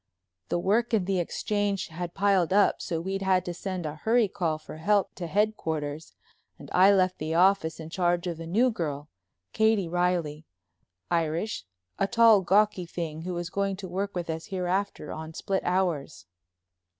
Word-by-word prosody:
The - - +1
work 220 +6 +1
in 200 -5 0
the 190 -1 0
Exchange 205 +3 -1
had 170 +1 -6
piled 195 -4 +2
up 200 +1 +3
so 165 - -2
we'd 190 +3 -3
had 185 -1 +2
to 175 - -3
send 185 -1 -4
a 150 0 -5
hurry 225 +5 +2
call 170 -5 -1
for 155 0 -11
help 200 +5 +1
to 175 - -6
headquarters 160 -7 -2 0.4
and - - -12
I 190 +2 +6
left 185 -2 +2
the 155 +1 -2
office 175 -2 +3
in 160 0 -8
charge 175 -1 +1
of 170 -2 -4
a 165 - -7
new 235 +9 +3
girl, 150 -8 -4 0.4
Katie 220 -4 +2
Reilly, 170 -3 -1 0.6
Irish, 170 - -1 0.3
a 195 - +2
tall, 230 -2 +6
gawky 195 -1 +2
thing, 160 -2 -5
who 180 +1 -4
was 175 0 -4
going 200 -1 -1
to 190 0 -7
work 195 +3 -3
with 175 -1 -3
us 160 0 -4
hereafter 190 +1 -2
on 160 0 -7
split 195 -1 -1
hours. 175 - -1
180 Hz, 175 wpm, -27 LUFS, 165-200 Hz, 0.6 s, I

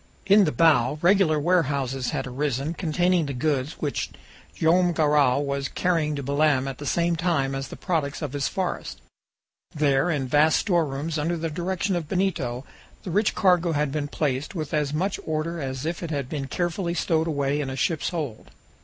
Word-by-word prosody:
In 200 +1 +6
the 155 - +1
bow 150 -5 +3
regular 175 -4 +4
warehouses 140 -6 0
had 145 -4 -2
arisen, 135 +3 -2
containing 175 -1 +1
the 140 - -4
goods 140 +2 0
which 145 -2 -3 0.5
Joam 175 +2 +3
Garral 145 -3 +3
was 140 -1 -2
carrying 160 -3 0
to 140 - -4
Belem 140 -1 +2
at 135 -1 -6
the 145 - -5
same 170 +4 +1
time 160 -5 0
as 135 0 -3
the - - -9
products 160 -4 -2
of 145 -2 -4
his 145 -1 -1
forests. 185 -2 -3 0.8
There, 145 +1 +2
in 140 -6 -1
vast 150 +4 +4
storerooms, 160 -4 0
under 170 +3 -1
the 165 0 -3
direction 185 +3 -1
of 165 -4 -4
Benito, 140 -10 -1 0.4
the 180 - -5
rich 205 +4 +1
cargo 180 -3 +3
had 150 -2 0
been 145 0 -2
placed 145 +1 -2
with 155 -2 -4
as 150 -2 0
much 185 +6 -1
order 160 +2 -2
as 130 0 -4
if 170 +1 -3
it 170 - -4
had 140 -4 -2
been 140 -3 -4
carefully 175 +2 -2
stowed 165 -2 +1
away 145 -1 0
in 135 - -3
a 130 - -4
ship's 160 +3 0
hold. 150 -11 -5
155 Hz, 185 wpm, -25 LUFS, 140-170 Hz, 0.8 s, In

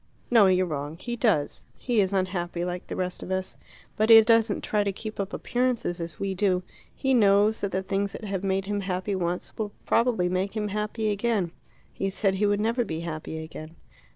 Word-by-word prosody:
"No; 225 -5 +7
you're 185 0 +3
wrong. 150 -1 -4
He 240 +6 -4
does. 210 - +1
He 240 -4 +1
is 190 -1 0
unhappy, 180 -2 -1
like 180 0 -5
the - - -5
rest 180 -1 -3
of - - -7
us. 190 0 -2 0.4
But 215 +1 +1
he 225 -1 +11
doesn't 225 -1 +3
try 210 -1 +1
to 200 - 0
keep 215 +2 -7
up 200 0 -2
appearances 240 -8 -1
as 165 -2 -6
we 195 -1 -1
do. 185 -1 +1 0.3
He 265 -1 +1
knows 210 -1 +4
that 200 - 0
the 190 0 -2
things 195 +1 -1
that - - -8
have 195 -2 -3
made 195 0 0
him 205 +1 -1
happy 190 +1 -2
once 180 -1 -2
will 210 -2 -2
probably 230 -6 +2
make 185 +4 -1
him 210 -1 -1
happy 210 +1 -1
again 205 -4 0 0.2
" - - -33
"He 195 - -2
said 195 0 0
he 205 +2 +1
would 205 0 +2
never 230 +3 +1
be 160 -6 -4
happy 160 -1 -5
again." 160 0 -9
195 Hz, 210 wpm, -26 LUFS, 180-215 Hz, 0.4 s, he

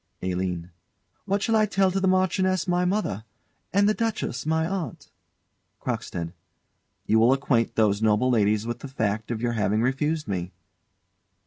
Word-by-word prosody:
ALINE. 90 -1 -2 0.5
What 200 0 0
shall 225 - +2
I 215 -1 +4
say 195 -2 +2
to 195 - 0
the 190 - +1
Marchioness, 185 0 +2
my 180 0 +2
mother, 180 - -1 0.5
and 200 +3 +3
the 215 - +4
Duchess, 215 - -2
my 160 0 +2
aunt? 185 -2 -5 0.7
CROCKSTEAD. 85 0 -4 0.7
You 110 - +3
will 120 +4 +5
acquaint 130 -4 +1
those 105 -2 +2
noble 110 +4 +3
ladies 105 -2 +2
with 120 0 -4
the 140 - -7
fact 110 -4 -2
of 115 -1 -3
your 120 -1 +1
having 105 0 +1
refused 150 +5 0
me. 90 -3 -3
130 Hz, 155 wpm, -25 LUFS, -, 0.7 s, will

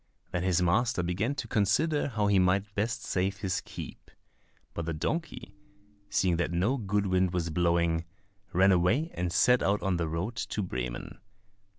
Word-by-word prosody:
Then 90 -2 -1
his 90 -1 +2
master 110 +2 +2
began 100 +10 -1
to - - -4
consider 145 +10 +1
how 110 -6 -1
he 100 -1 +4
might 100 +2 +1
best 115 +3 -2
save 95 +1 -1
his 95 -2 -1
keep; - - -9 0.6
but 85 - -4
the 85 - -2
donkey, 125 - -3 0.6
seeing 90 -3 +2
that 85 0 -1
no 95 +10 +1
good 105 -3 0
wind 95 -1 +1
was 85 -2 -1
blowing, 85 0 +1 0.5
ran 95 +3 +4
away 110 - +2
and 90 -1 -2
set 125 +7 +4
out 100 +1 +1
on 95 -3 +1
the 85 -1 -1
road 90 +9 -3
to 110 -2 -2
Bremen. 60 -8 -5
95 Hz, 170 wpm, -29 LUFS, 85-110 Hz, 0.6 s, he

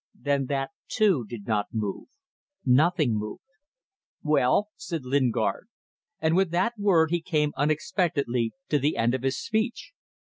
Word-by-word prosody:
Then 140 -2 0
that, 135 -1 -2 0.2
too, 195 - +2
did 115 -4 -7
not 105 -2 0
move. 105 -3 -3 0.6
Nothing 140 - +3
moved. 105 0 -6 0.8
"Well," 150 +7 +2
said 165 -4 -5
Lingard, 130 -2 0 0.5
and 160 +1 +2
with 190 -1 +3
that 175 +8 +1
word 170 -6 +3
he 175 -1 +1
came 150 -3 0
unexpectedly 145 - 0 0.2
to 150 - +2
the 145 +3 0
end 115 +1 +2
of 130 - -1
his 135 +1 0
speech. 225 +7 -2
145 Hz, 140 wpm, -26 LUFS, 125-170 Hz, 0.8 s, Nothing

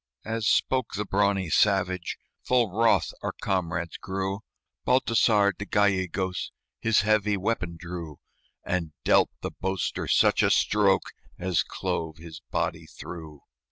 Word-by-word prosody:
As 110 -1 -2
spoke 130 -3 +1
the 105 +1 -2
brawny 95 -3 +1
savage, 95 -3 +2 0.3
Full 120 -5 +2
wroth 115 +4 +2
our - - -3
comrades 90 -2 -2
grew 95 +1 -3 0.4
Baltasar 115 -5 +3
de 100 - -6
Gallegos 95 -3 0 0.3
His 115 -3 +3
heavy 105 0 +2
weapon 90 -4 -2
drew, 85 -3 -7 0.5
And 85 -4 -2
dealt - - +4
the - - -4
boaster 95 0 -3
such - - +4
a - - +3
stroke 95 +8 +2 0.2
As 90 -2 +1
clove 80 -1 -3
his 80 -1 -10
body - - -2
through. 80 -4 -10
95 Hz, 125 wpm, -27 LUFS, 85-105 Hz, 0.5 s, dealt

